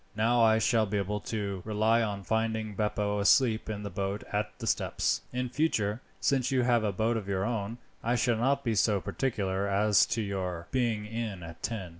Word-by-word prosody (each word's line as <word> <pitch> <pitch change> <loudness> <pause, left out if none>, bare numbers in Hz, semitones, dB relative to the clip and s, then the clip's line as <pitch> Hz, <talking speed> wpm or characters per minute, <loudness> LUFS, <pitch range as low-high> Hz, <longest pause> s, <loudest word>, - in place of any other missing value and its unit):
Now 115 +3 +3
I 110 -1 +5
shall 110 0 +2
be 105 +1 -1
able 100 +1 -1
to 100 -4 -3
rely 110 +2 +2
on 100 -3 -2
finding 110 +1 -1
Beppo 105 0 -1
asleep 110 +2 +3
in 105 -1 -4
the 100 - -5
boat 100 +3 -3
at 105 0 0
the - - -6
steps. - - 0
In 125 0 -2
future, 120 -6 0 0.2
since 130 -2 +1
you 130 -2 +2
have 120 -2 +3
a 105 - +1
boat 110 +4 0
of 105 -3 -5
your 95 0 0
own, 115 -1 -2 0.3
I 120 +2 +1
shall 120 -1 +2
not 140 +4 +1
be 115 - 0
so 105 -1 +2
particular 100 -4 -1
as 100 +1 +4
to 115 -1 -1
your 90 -4 -3
being 115 -5 0
in 105 -4 -4
at 80 0 -10
ten. 105 -6 -3
110 Hz, 200 wpm, -29 LUFS, 100-115 Hz, 0.3 s, I